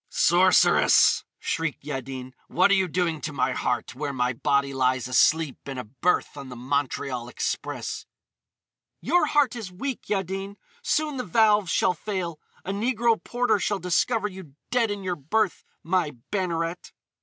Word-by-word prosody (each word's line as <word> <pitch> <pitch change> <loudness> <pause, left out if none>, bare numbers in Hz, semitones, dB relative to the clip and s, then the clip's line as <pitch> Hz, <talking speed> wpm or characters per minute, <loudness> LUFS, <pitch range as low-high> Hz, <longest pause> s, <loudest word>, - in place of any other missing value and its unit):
"Sorceress!" - - +5
shrieked 160 -4 -3
Yaddin, 130 -2 -6
"what 185 +3 +3
are - - +6
you 190 -2 +3
doing 170 -2 -1
to 150 - -4
my 140 -2 0
heart, 125 0 -2
where 145 +2 -3
my 125 -2 0
body 140 +2 +1
lies 130 -1 +1
asleep 155 +3 +3
in 135 - -5
a 125 - -4
berth 135 +13 -1
on 140 -2 -8
the 125 - -8
Montreal 130 -1 -2
Express!" - - -4 0.9
"Your 355 - +2
heart 285 -5 +2
is 220 -6 -6
weak, 255 +8 -5
Yaddin. 195 0 -2 0.3
Soon 305 - 0
the 250 - -2
valves 210 -6 +3
shall 180 - +2
fail. 175 -3 -4 0.3
A 195 - -2
negro 230 +2 +1
porter 245 -3 +1
shall 205 +1 0
discover 200 +5 +1
you 185 -8 -11 0.2
dead 240 -3 +2
in 205 -1 -4
your 180 -1 -1
berth, 185 +7 -1 0.2
my 170 -3 0 0.2
Banneret!" 170 -3 -2
175 Hz, 155 wpm, -25 LUFS, 140-205 Hz, 0.9 s, are